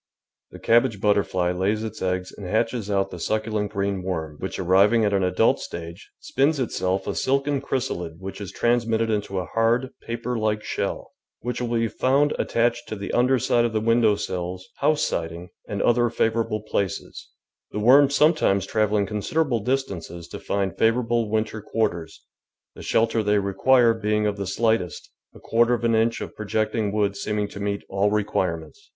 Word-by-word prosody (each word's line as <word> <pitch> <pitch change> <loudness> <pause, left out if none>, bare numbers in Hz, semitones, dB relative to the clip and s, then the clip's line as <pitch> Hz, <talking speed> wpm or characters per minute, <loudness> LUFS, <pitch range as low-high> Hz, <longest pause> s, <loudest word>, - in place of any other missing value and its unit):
The - - -11
cabbage 115 -2 +2
butterfly 100 -3 +1
lays 100 +4 0
its 110 -1 -6
eggs 90 0 -1
and 100 - -8
hatches 110 +1 -1
out 95 -1 0
the 90 - -7
succulent 110 +2 -1
green 100 -2 -1
worm, 80 -5 -4
which, 95 - -4
arriving 100 +5 +4
at 100 - +1
an 100 - +2
adult 90 - +2
stage, 85 +3 -8
spins 140 +3 +1
itself 95 -6 -1
a - - -2
silken 140 +1 0
chrysalid 90 -12 -3
which 95 +2 -8
is 100 - -6
transmitted 115 -1 +1
into 105 -2 -2
a 90 - -1
hard, 115 +5 +1
paper 120 +1 -3
like 105 -1 0
shell, - - -3 0.3
which 125 +1 -3
will 120 -1 -1
be 115 0 +1
found 140 +6 +2
attached 120 0 0
to - - -3
the 100 -1 -5
underside 125 -1 +2
of 120 -1 -1
the 110 - +1
window 115 -1 +3
sills, 90 -1 -4
house 150 +1 +2
siding, 85 +1 -3 0.2
and 100 -3 -2
other 120 0 +3
favourable 115 -2 0
places, 100 -4 -3 0.4
the - - -6
worms 135 +6 +5
sometimes 145 - +3
travelling 105 -1 +1
considerable 120 +6 -1
distances 100 -9 -3
to - - -7
find 100 -2 -2
favourable 115 -1 +2
winter 110 0 -1
quarters, 85 -7 -3 0.5
the - - -11
shelter 115 0 +1
they 105 0 +2
require 115 +5 +3
being 105 -1 0
of 105 -1 0
the 100 -2 -4
slightest, 110 -4 -1 0.2
a - - -12
quarter 120 +1 +2
of 120 - -7
an 115 -1 +2
inch 115 +1 +1
of - - -7
projecting 110 0 -1
wood 100 -1 0
seeming 105 0 -2
to 100 - -10
meet 100 0 -2
all 100 +1 +1
require 100 -5 0
ments. 80 -2 -15
110 Hz, 175 wpm, -24 LUFS, 95-120 Hz, 0.5 s, worms